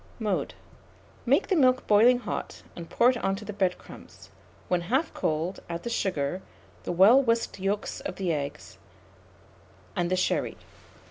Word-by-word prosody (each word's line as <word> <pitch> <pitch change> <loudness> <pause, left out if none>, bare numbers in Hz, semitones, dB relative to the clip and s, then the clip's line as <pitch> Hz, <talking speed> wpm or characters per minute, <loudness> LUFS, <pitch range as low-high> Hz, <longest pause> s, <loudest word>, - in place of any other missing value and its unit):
Mode. 210 -5 -2 0.7
Make - - +3
the 385 - +3
milk 255 -4 +3
boiling 230 +4 +5
hot, 245 - -6
and 170 -1 -9
pour 245 +2 +4
it 250 - -4
on 195 -4 -1
to 210 +2 -9
the 210 - -6
bread 190 -3 0
crumbs; - - -14 0.4
when 180 -1 +1
half 265 - -1
cold, 160 +4 -2
add 170 0 -5
the 235 - -4
sugar, 180 -5 -1 0.4
the - - -2
well 200 +10 +6
whisked 230 -5 -1
yolks 195 +2 -2
of - - -6
the 185 -4 -1
eggs, 145 0 -6 1.2
and 175 - 0
the 185 - +1
sherry. 185 - -1
195 Hz, 160 wpm, -27 LUFS, 175-235 Hz, 1.2 s, well